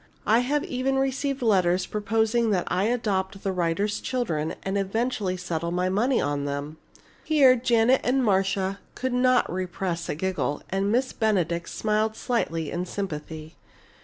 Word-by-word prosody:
I 225 Hz, +2 st, +4 dB
have 280 Hz, +4 st, 0 dB
even 265 Hz, +1 st, -1 dB
received 270 Hz, 0 st, -1 dB
letters 185 Hz, -4 st, +3 dB
proposing 220 Hz, +2 st, +1 dB
that 190 Hz, -4 st, +1 dB
I 185 Hz, +2 st, +1 dB
adopt 200 Hz, -5 st, -1 dB
the 195 Hz, -, 0 dB
writer's 180 Hz, +3 st, 0 dB
children 170 Hz, -12 st, -2 dB
and 195 Hz, +1 st, -2 dB
eventually 200 Hz, -1 st, -1 dB
settle 170 Hz, -2 st, -3 dB
my 180 Hz, +1 st, 0 dB
money 235 Hz, +7 st, +2 dB
on 145 Hz, 0 st, -1 dB
them!" 145 Hz, +2 st, -4 dB, 0.5 s
Here 280 Hz, -5 st, +5 dB
Janet 240 Hz, +1 st, +3 dB
and 255 Hz, +1 st, +2 dB
Marcia 195 Hz, -1 st, +1 dB, 0.2 s
could 260 Hz, -1 st, -2 dB
not 250 Hz, -4 st, +3 dB
repress 180 Hz, -1 st, -3 dB
a -, -, -1 dB
giggle, 185 Hz, -3 st, -2 dB
and 195 Hz, +1 st, 0 dB
Miss 255 Hz, +3 st, +1 dB
Benedict 175 Hz, -6 st, 0 dB
smiled 215 Hz, 0 st, 0 dB
slightly 165 Hz, -12 st, -2 dB
in 180 Hz, +1 st, -3 dB
sympathy. 160 Hz, -4 st, -6 dB
200 Hz, 150 wpm, -25 LUFS, 180-240 Hz, 0.5 s, Here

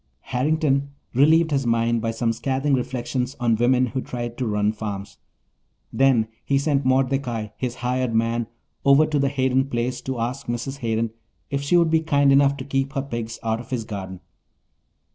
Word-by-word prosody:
Harrington 140 Hz, +1 st, 0 dB, 0.2 s
relieved 160 Hz, +5 st, +4 dB
his 135 Hz, -3 st, 0 dB
mind 115 Hz, 0 st, +2 dB
by 115 Hz, -, -1 dB
some 115 Hz, 0 st, 0 dB
scathing 135 Hz, +4 st, -1 dB
reflections 125 Hz, 0 st, -2 dB
on 120 Hz, -2 st, +2 dB
women 125 Hz, +3 st, +3 dB
who 130 Hz, +2 st, -3 dB
tried 120 Hz, -2 st, -5 dB
to 125 Hz, -, -1 dB
run 105 Hz, 0 st, +1 dB
farms. 105 Hz, -2 st, -6 dB, 0.7 s
Then 130 Hz, -5 st, +3 dB, 0.2 s
he 140 Hz, -, +1 dB
sent 140 Hz, 0 st, +1 dB
Mordecai, 130 Hz, -4 st, 0 dB
his 125 Hz, -1 st, -3 dB
hired 125 Hz, -2 st, 0 dB
man, 115 Hz, 0 st, +1 dB, 0.4 s
over 140 Hz, +2 st, +6 dB
to 150 Hz, -1 st, 0 dB
the 140 Hz, 0 st, +2 dB
Hayden 130 Hz, -1 st, +1 dB
place 120 Hz, 0 st, -2 dB
to 130 Hz, -2 st, -4 dB
ask 125 Hz, +4 st, -3 dB
Mrs. 125 Hz, +4 st, -3 dB
Hayden 115 Hz, -1 st, -1 dB, 0.4 s
if 140 Hz, 0 st, -1 dB
she 140 Hz, +5 st, +3 dB
would 170 Hz, -2 st, +3 dB
be 160 Hz, -, +4 dB
kind 140 Hz, -3 st, +3 dB
enough 140 Hz, 0 st, +4 dB
to 130 Hz, -, -6 dB
keep 135 Hz, 0 st, -1 dB
her 135 Hz, -3 st, -1 dB
pigs 115 Hz, -4 st, -5 dB
out 110 Hz, 0 st, 0 dB
of 120 Hz, -, -10 dB
his 125 Hz, -3 st, -2 dB
garden. 95 Hz, -4 st, -7 dB
130 Hz, 180 wpm, -23 LUFS, 115-140 Hz, 0.7 s, over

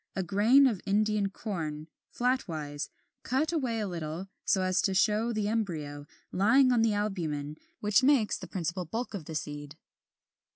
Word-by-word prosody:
A 190 Hz, -, -1 dB
grain 215 Hz, +9 st, +5 dB
of 225 Hz, -8 st, +1 dB
Indian 210 Hz, 0 st, +2 dB
Corn, 160 Hz, -7 st, -5 dB, 0.2 s
flatwise, 160 Hz, -, -2 dB, 0.3 s
cut 305 Hz, +6 st, 0 dB
away 255 Hz, -8 st, 0 dB
a 210 Hz, -, -1 dB
little, 170 Hz, +1 st, -5 dB
so 190 Hz, -, +2 dB
as 185 Hz, 0 st, +2 dB
to 195 Hz, -, 0 dB
show 215 Hz, +4 st, +2 dB
the 215 Hz, -2 st, -1 dB
embryo, 155 Hz, -10 st, -3 dB, 0.2 s
lying 255 Hz, +8 st, +4 dB
on 240 Hz, -2 st, +3 dB
the 225 Hz, -2 st, +3 dB
albumen 160 Hz, -8 st, -2 dB, 0.3 s
which 210 Hz, +2 st, +4 dB
makes 260 Hz, -5 st, +3 dB
the -, -, -7 dB
principal 180 Hz, 0 st, -3 dB
bulk 230 Hz, +9 st, -4 dB
of 185 Hz, -7 st, -5 dB
the 160 Hz, -, -7 dB
seed. 145 Hz, 0 st, -5 dB
200 Hz, 160 wpm, -29 LUFS, 160-225 Hz, 0.3 s, grain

